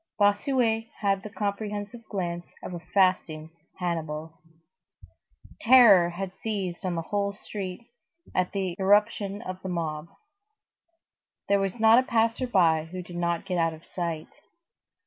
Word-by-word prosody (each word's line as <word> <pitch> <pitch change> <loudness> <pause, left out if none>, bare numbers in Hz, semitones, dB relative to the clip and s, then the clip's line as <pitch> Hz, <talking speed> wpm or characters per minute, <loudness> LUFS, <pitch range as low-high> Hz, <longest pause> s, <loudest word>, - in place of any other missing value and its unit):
Bossuet 225 +2 +2
had 195 -2 +1
the 210 - -8
comprehensive 205 +2 -4
glance 175 -3 -3 0.2
of - - -6
a 175 - -5
fasting 175 -3 +1 0.3
Hannibal. 160 -3 -3 1.3
Terror 225 -8 +7
had 185 +2 -5
seized 195 -5 -4
on 180 -2 -1
the 165 - -2
whole 200 +3 -1
street 200 +1 -7 0.5
at 180 0 0
the 190 -3 -2
irruption 205 +1 +2
of 185 -2 -6
the 190 - -5
mob. 160 -3 -3 1.4
There 200 0 +4
was 195 +3 -2
not 225 +2 +7
a - - -19
passer 230 +2 +1
by 165 -8 +3
who 180 +2 -7
did 175 0 -11
not 170 0 -1
get 180 -3 -1
out 165 -1 +1
of 160 - -17
sight. 170 -3 -4
190 Hz, 140 wpm, -27 LUFS, 170-210 Hz, 1.4 s, Terror